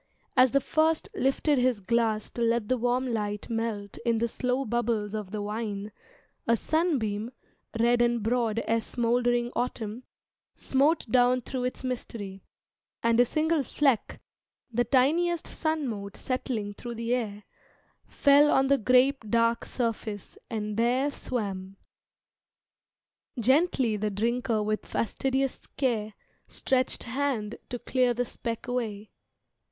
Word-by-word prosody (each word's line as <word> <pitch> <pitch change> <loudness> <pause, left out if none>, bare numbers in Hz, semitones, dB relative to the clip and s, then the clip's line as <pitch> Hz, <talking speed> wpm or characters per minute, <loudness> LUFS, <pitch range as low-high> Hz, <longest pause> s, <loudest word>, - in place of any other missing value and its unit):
As 255 0 +6
the 275 +3 +2
first 315 +3 +1
Lifted 270 +2 +2
his 250 -3 +2
glass 220 +1 0
to 235 - -5
let 230 -2 +1
the 255 - +2
warm 245 +2 +1
light 210 -3 -3
melt 225 -3 -3
In 235 -2 +2
the 235 +1 +1
slow 250 +3 -1
bubbles 220 -2 -1
of 210 -3 -4
the 210 +1 -4
wine, 210 -1 -4 0.6
a 230 0 +4
sunbeam, 235 - 0 0.5
Red 240 +1 +4
and 240 -2 +2
broad 230 -1 +1
as 225 0 0
smouldering 240 0 +1
autumn, 230 -2 -3 0.5
smote 290 +5 +2
Down 250 +1 +4
through 250 +1 -3
its 250 - -4
mystery; 215 -6 -5 0.6
and 230 0 +3
a 245 - +7
single 315 +4 +1
fleck, 270 -3 0 0.5
The 240 +2 +2
tiniest 320 +8 +2
sun 315 -3 -1
mote 200 -3 -5
settling 240 -5 -3
through 235 +3 -7
the 230 +1 -1
air, 210 -4 -2 0.6
Fell 285 +1 +5
on 270 -1 +3
the 280 -1 +4
grape 255 +2 +3
dark 230 +1 +2
surface 220 -4 -3
and 210 -2 -3
there 250 +5 +2
swam. 195 -8 -4 1.6
Gently 260 -2 +3
the 210 +1 -1
Drinker 230 +2 0
with 215 0 -1
fastidious 265 +3 -1
care 220 -6 0 0.3
Stretched 255 -1 0
hand 240 -4 -2
to 245 - -3
clear 250 0 +1
the 245 +1 0
speck 230 0 -5
away. 220 -4 -3
235 Hz, 135 wpm, -28 LUFS, 215-255 Hz, 1.6 s, a